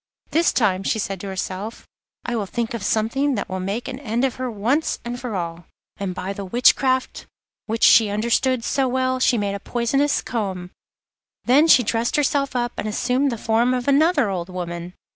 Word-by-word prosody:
'This 335 +2 +3
time,' 195 -6 +1
she 205 - 0
said 195 -3 -3
to 200 - -6
herself, 190 +3 -5 0.4
'I 245 - -2
will 215 -3 -1
think 235 +4 -3
of 230 - -4
something 250 +8 0
that 205 - -3
will 185 - -4
make 200 +6 -3
an 260 -1 -6
end 240 -1 -1
of 260 - -2
her 255 0 -3
once 240 +8 0
and 240 +1 -4
for 240 -4 -5
all.' 170 -1 -4 0.3
And 190 -2 -4
by 195 +2 -4
the 200 - -6
witchcraft 255 +5 +2 0.4
which 225 +1 -2
she 220 -3 +7
understood 235 +4 +1
so 270 +2 +1
well 255 0 0
she 255 -1 +3
made 200 -2 -1
a 200 - -4
poisonous 275 +7 0
comb; 190 -6 -4 0.7
then 285 +6 +5
she 265 -6 +6
dressed 230 +2 0
herself 280 -2 +1
up 240 -1 0
and - - -3
assumed 250 +5 0
the 235 - -3
form 235 +3 +1
of 250 +1 -4
another 290 -2 +3
old 175 -1 -4
woman. 175 -1 -6
235 Hz, 195 wpm, -22 LUFS, 200-260 Hz, 0.7 s, she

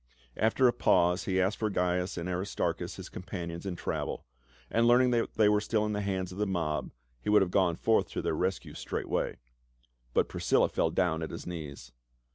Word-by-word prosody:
After 115 +4 +3
a 120 - +3
pause 90 -6 +3
he 95 -1 +1
asked 95 +3 +1
for 110 - 0
Gains 90 -1 0
and 85 0 -3
Aristarchus 90 +2 -2
his - - -8
com - - -8
panions 85 -1 -6
in 90 - -3
travel, - - -3 0.5
and 115 +1 +3
learning 125 +1 +5
that 120 -1 0
they 110 -1 +5
were 105 0 +3
still 105 0 0
in 105 - -1
the 105 - -1
hands 95 -2 -2
of 95 - -8
the 105 - +1
mob, 75 -7 -1 0.3
he - - -3
would 105 -1 +6
have 90 - -4
gone 90 -3 +3
forth 110 +5 +2
to - - -2
their - - 0
rescue 95 +4 -2
straightway. - - -2 0.8
But - - +3
Priscilla - - +2
fell 80 - +1
down 80 -1 +1
at 80 - -3
his - - -7
knees. 75 -8 -7
95 Hz, 205 wpm, -30 LUFS, 85-105 Hz, 0.8 s, would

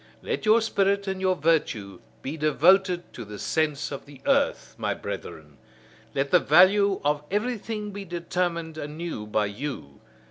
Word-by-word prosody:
Let - - -3
your 220 +2 +6
spirit 200 -2 +1
and 190 -1 -3
your 185 -1 +2
virtue 145 - 0 0.2
be 140 +4 -4
devoted 175 +4 +3
to 120 - -7
the 105 -1 -9
sense 150 +4 -1
of 140 - -7
the 140 -2 -13
earth, - - +1
my - - -1
brethren: 75 -2 -8 0.6
let 140 0 0
the 180 - +7
value 190 +5 +5
of 145 0 +2
everything 210 0 -2
be 200 0 -6
determined 170 -2 -2
anew 150 -7 -5
by 105 0 +1
you! 100 - -6
165 Hz, 150 wpm, -26 LUFS, 140-195 Hz, 0.6 s, the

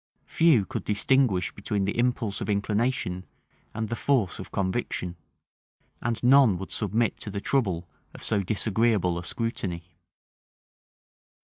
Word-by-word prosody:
Few 155 - +4
could 115 -4 -5
distinguish 105 -2 +2
between 100 -1 -2
the 100 - -2
impulse 120 -4 0
of 100 - -3
inclination 105 -2 -1 0.4
and 110 0 -3
the 115 - -3
force 115 -7 +1
of - - -8
conviction; 95 -2 -2 0.9
and 115 0 -2
none 125 -6 +6
would 95 - -7
submit 110 +2 0
to - - -6
the 100 0 -4
trouble 95 -9 0 0.3
of - - -11
so 105 -3 +1
disagreeable 105 -2 +1
a - - -7
scrutiny. 95 -5 -3
105 Hz, 130 wpm, -26 LUFS, 95-120 Hz, 0.9 s, none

